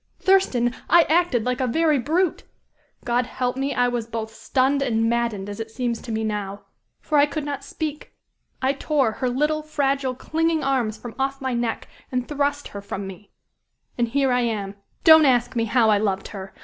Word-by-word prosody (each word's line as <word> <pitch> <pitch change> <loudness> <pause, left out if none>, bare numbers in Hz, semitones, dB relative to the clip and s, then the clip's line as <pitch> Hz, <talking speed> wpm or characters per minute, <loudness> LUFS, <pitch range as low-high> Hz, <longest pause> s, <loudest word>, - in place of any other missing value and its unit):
Thurston! 255 -11 +3 0.2
I 345 0 +7
acted 320 -8 +2
like 250 +1 -1
a 255 - +1
very 305 +3 +2
brute! 320 +7 0 0.6
God 245 0 +1
help 250 -1 -2
me, 275 +1 -2
I 245 0 +3
was 240 -2 -2
both 225 -1 -5
stunned 270 +4 +1
and 225 -4 +1
maddened, 230 -4 -1
as 205 +1 -7
it 225 0 -5
seems 235 0 -3
to 235 - -7
me 220 0 -1
now. 205 -2 -3 0.4
For 300 -2 +1
I 285 - +5
could 290 0 -4
not 285 -1 -4
speak. 300 +1 -5 0.5
I 265 +1 +3
tore 280 -4 +1
her 250 +3 -2
little, 300 +5 0
fragile, 275 -3 -1
clinging 320 +4 0
arms 250 -5 0
from 230 +1 -9
off 270 0 -1
my 260 -1 -2
neck, 235 -1 -2 0.2
and 250 -1 -1
thrust 290 0 -1
her 200 - -7
from 200 0 -5
me. 195 +1 -10 0.7
And 240 -1 +1
here 270 +2 +1
I 250 0 +2
am. 210 -4 -2 0.3
Don't 315 -1 +8
ask 245 0 +2
me 230 -1 +1
how 225 -1 +3
I 205 - +4
loved 195 -2 -1
her! 195 -2 -8
250 Hz, 195 wpm, -23 LUFS, 225-285 Hz, 0.7 s, Don't